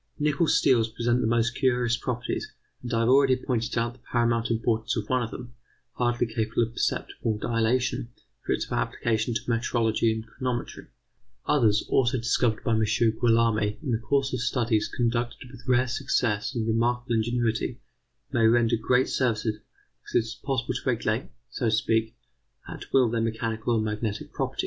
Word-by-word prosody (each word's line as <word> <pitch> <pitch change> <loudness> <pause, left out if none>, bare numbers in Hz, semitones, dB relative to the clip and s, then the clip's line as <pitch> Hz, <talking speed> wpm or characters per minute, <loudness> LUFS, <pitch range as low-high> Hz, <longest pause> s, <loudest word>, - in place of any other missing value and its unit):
Nickel 150 +2 +1
steels 120 -7 +3
present 120 +2 0
the - - +1
most 115 0 +2
curious 125 -3 +1
properties, 120 -1 -3 0.3
and 125 - -6
I 115 -1 +1
have 115 - +2
already 135 0 +5
pointed 120 -3 -2
out 115 +1 0
the 130 - -21
paramount 115 -1 0
importance 115 0 0
of 105 -2 -3
one 130 -1 +1
of 115 - -3
them, 120 -1 -9 0.4
hardly 120 0 +1
capable 110 0 0
of 115 - -4
perceptible 110 -2 -2
dilatation, 120 +3 0 0.4
for - - -3
its - - -1
application 110 - -1
to - - 0
metrology 115 -1 +1
and 110 0 -4
chronometry. 120 +1 -4 0.6
Others, 110 -7 +3
also 130 0 +2
discovered 115 -1 +1
by - - 0
M. 110 0 +3
Guillaume 115 0 +2
in 105 +4 -2
the 115 - +1
course 135 +4 +1
of 125 - -1
studies 115 -3 +1
conducted 120 +1 -2
with 130 0 -14
rare 125 0 +3
success 125 -3 -1
and 115 -2 -1
remarkable 120 +2 0
ingenuity, 115 0 0 0.5
may 115 -1 +3
render 115 0 +3
great 125 +3 +2
services, 110 -4 0 0.4
because - - -11
it 115 - +3
is 115 - -6
possible 130 -3 -2
to 125 - -4
regulate, 115 -2 -1 0.2
so 125 - -3
to - - +2
speak, 110 +1 +1 0.5
at - - -9
will 130 -2 +5
their 115 0 -1
mechanical 115 0 -1
or - - +2
magnetic 105 0 -3
properties. - - -3
115 Hz, 170 wpm, -26 LUFS, 110-125 Hz, 0.6 s, already